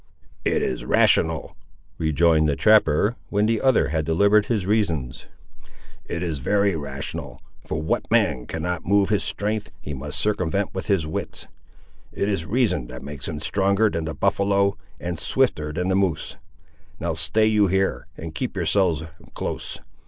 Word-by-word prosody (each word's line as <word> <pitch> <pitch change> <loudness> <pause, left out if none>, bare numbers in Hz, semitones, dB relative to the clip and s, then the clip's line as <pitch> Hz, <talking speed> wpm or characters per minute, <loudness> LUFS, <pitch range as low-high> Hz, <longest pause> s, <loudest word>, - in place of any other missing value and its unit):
"It - - +1
is 65 - -2
rational," - - +2 0.4
rejoined 80 0 +3
the 70 - +1
trapper, 105 - +4
when 105 +1 +2
the 115 0 +1
other 130 -2 +3
had 80 -1 0
delivered 100 +7 +3
his 105 -6 -1
reasons; 85 - -1 0.8
"it 85 - -4
is 80 -5 -2
very 100 +6 +2
rational, 70 -3 -5 0.2
for 75 - -3
what 80 - -1
man 60 -1 +2
cannot 85 +1 -3
move 100 +2 +2
with 105 -2 +2
his - - -4
strength 105 -2 -2
he 75 -5 -6
must 70 +2 -5
circumvent 100 -2 0
with 95 - -5
his 95 -6 +2
wits. 80 - -5 0.7
It 100 - -1
is 95 -6 -1
reason 100 - +1
that 65 +1 -9
makes 70 -1 -4
him 75 -3 -4
stronger 100 +5 +2
than 80 -1 -2
the 80 - -4
buffaloe, 100 0 +2 0.2
and 85 -1 -4
swifter 90 -15 0
than 90 +4 -2
the 95 - +2
moose. 95 -6 0 0.6
Now 85 -1 -1
stay 85 +7 +2
you 105 -2 +4
here, 95 +1 0
and 80 -1 -7
keep - - -3
yourselves 90 -6 +1 0.3
close. - - -4
90 Hz, 160 wpm, -23 LUFS, 80-100 Hz, 0.8 s, trapper